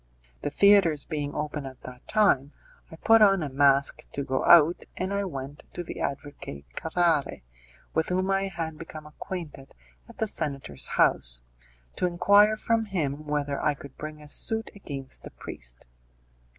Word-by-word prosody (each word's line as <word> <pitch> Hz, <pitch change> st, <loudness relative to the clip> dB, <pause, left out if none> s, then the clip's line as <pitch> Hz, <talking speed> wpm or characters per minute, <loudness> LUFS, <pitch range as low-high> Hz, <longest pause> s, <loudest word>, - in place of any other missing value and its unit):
The -, -, -1 dB
theatres 185 Hz, -4 st, +4 dB
being 145 Hz, -3 st, -4 dB
open 150 Hz, -2 st, -3 dB
at 130 Hz, -1 st, -11 dB
that 125 Hz, -1 st, -11 dB
time 175 Hz, -10 st, +3 dB, 0.4 s
I -, -, -10 dB
put 225 Hz, +7 st, +5 dB
on 195 Hz, -4 st, +5 dB
a 145 Hz, -, -3 dB
mask 140 Hz, 0 st, +2 dB
to 140 Hz, -, -2 dB
go 130 Hz, 0 st, -1 dB
out, 170 Hz, 0 st, +6 dB
and 185 Hz, +2 st, -2 dB
I, 200 Hz, 0 st, 0 dB
went 140 Hz, -4 st, -7 dB
to 175 Hz, -, -4 dB
the -, -, -7 dB
advocate 140 Hz, -, -5 dB
Carrare, 160 Hz, -, 0 dB, 0.5 s
with 160 Hz, -, +1 dB
whom 185 Hz, +1 st, 0 dB
I 195 Hz, 0 st, +1 dB
had 165 Hz, -4 st, -5 dB
become 155 Hz, -2 st, -9 dB
acquainted 150 Hz, -2 st, -8 dB, 0.3 s
at -, -, -14 dB
the 220 Hz, -, 0 dB
senator's 140 Hz, -, -3 dB
house, -, -, +3 dB, 0.6 s
to 180 Hz, -, +2 dB
inquire 205 Hz, +5 st, +5 dB
from 225 Hz, +1 st, +1 dB
him 155 Hz, -7 st, -3 dB
whether 145 Hz, -1 st, -1 dB
I 150 Hz, -, +1 dB
could 140 Hz, -1 st, -12 dB
bring 155 Hz, 0 st, -8 dB
a -, -, -12 dB
suit 225 Hz, +9 st, -1 dB
against 140 Hz, -9 st, -6 dB
the -, -, -9 dB
priest. -, -, -8 dB
155 Hz, 165 wpm, -27 LUFS, 140-185 Hz, 0.6 s, out